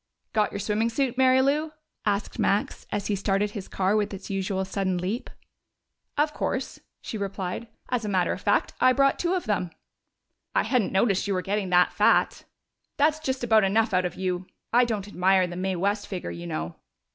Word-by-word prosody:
"Got 210 Hz, -2 st, +2 dB
your -, -, -4 dB
swimming 210 Hz, +3 st, 0 dB
suit, 255 Hz, +1 st, 0 dB
Mary 260 Hz, 0 st, +5 dB
Lou?" 300 Hz, +3 st, +1 dB, 0.3 s
asked 205 Hz, 0 st, -1 dB
Max, 200 Hz, +1 st, 0 dB
as 205 Hz, -, -2 dB
he 205 Hz, -, 0 dB
started 200 Hz, +1 st, 0 dB
his 205 Hz, -3 st, -6 dB
car 195 Hz, +2 st, +1 dB
with 210 Hz, -2 st, 0 dB
its 195 Hz, +1 st, -8 dB
usual 190 Hz, 0 st, -1 dB
sudden 190 Hz, -1 st, -1 dB
leap. 195 Hz, +8 st, -3 dB, 0.9 s
"Of 300 Hz, +1 st, +2 dB
course," -, -, -3 dB, 0.2 s
she 220 Hz, -, -5 dB
replied. 195 Hz, +2 st, -4 dB, 0.2 s
"As 250 Hz, -2 st, 0 dB
a 210 Hz, -, -2 dB
matter 185 Hz, -3 st, +1 dB
of -, -, -7 dB
fact, -, -, +1 dB
I 255 Hz, -, +6 dB
brought 275 Hz, +1 st, +3 dB
two 350 Hz, +1 st, +1 dB
of 365 Hz, -, -2 dB
them." 190 Hz, -4 st, 0 dB, 0.9 s
"I -, -, +4 dB
hadn't 245 Hz, -7 st, +1 dB
noticed 195 Hz, 0 st, +2 dB
you 200 Hz, -, 0 dB
were 185 Hz, -, -1 dB
getting 200 Hz, -1 st, -1 dB
that 180 Hz, 0 st, +4 dB
fat!" -, -, +3 dB, 0.5 s
"That's 305 Hz, +2 st, +3 dB
just 265 Hz, -4 st, -2 dB
about 220 Hz, -3 st, +5 dB
enough 220 Hz, +2 st, +2 dB
out 185 Hz, 0 st, +3 dB
of 180 Hz, -, -3 dB
you! 185 Hz, -1 st, -2 dB, 0.3 s
I 245 Hz, +1 st, +6 dB
don't 210 Hz, -4 st, -3 dB
admire 190 Hz, -1 st, +3 dB
the 175 Hz, 0 st, -6 dB
Mae 190 Hz, +1 st, -1 dB
West 200 Hz, +3 st, -1 dB
figure, 180 Hz, -, -5 dB
you 85 Hz, 0 st, -7 dB
know." 80 Hz, 0 st, -4 dB
200 Hz, 195 wpm, -26 LUFS, 190-235 Hz, 0.9 s, I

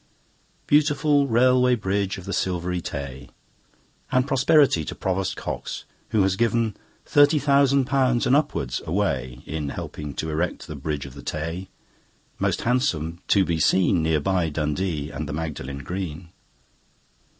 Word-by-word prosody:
Beautiful 145 Hz, -1 st, +3 dB
Railway 125 Hz, +1 st, +4 dB
Bridge 100 Hz, -2 st, -1 dB
of 95 Hz, -, -9 dB
the 100 Hz, -, -4 dB
Silvery 90 Hz, -1 st, -1 dB
Tay! 70 Hz, -3 st, -6 dB, 0.8 s
And 130 Hz, 0 st, +3 dB
prosperity 135 Hz, -, +4 dB
to -, -, -5 dB
Provost 95 Hz, 0 st, -2 dB
Cox, -, -, -5 dB, 0.3 s
who 110 Hz, -3 st, +3 dB
has 95 Hz, -1 st, +2 dB
given 115 Hz, -1 st, +1 dB, 0.3 s
Thirty 145 Hz, +2 st, +5 dB
thousand 140 Hz, -1 st, +3 dB
pounds 130 Hz, -2 st, +2 dB
and 125 Hz, +2 st, +4 dB
upwards 105 Hz, -, 0 dB
away 65 Hz, -9 st, -1 dB
In 75 Hz, -2 st, -3 dB
helping 75 Hz, 0 st, -6 dB
to 80 Hz, -, -3 dB
erect 85 Hz, +3 st, -2 dB
the 80 Hz, -, -7 dB
Bridge 70 Hz, 0 st, -3 dB
of 65 Hz, -, -10 dB
the -, -, -10 dB
Tay, 80 Hz, +4 st, -4 dB, 0.7 s
Most -, -, 0 dB
handsome 85 Hz, -, 0 dB
to 100 Hz, -2 st, +4 dB
be 85 Hz, -2 st, -1 dB
seen, 90 Hz, +2 st, +3 dB
Near 80 Hz, -1 st, +2 dB
by 90 Hz, 0 st, 0 dB
Dundee 75 Hz, 0 st, -2 dB
and 75 Hz, -1 st, -5 dB
the -, -, -3 dB
Magdalen 70 Hz, -3 st, -5 dB
Green. 90 Hz, +1 st, -5 dB
95 Hz, 145 wpm, -24 LUFS, 75-125 Hz, 0.8 s, Thirty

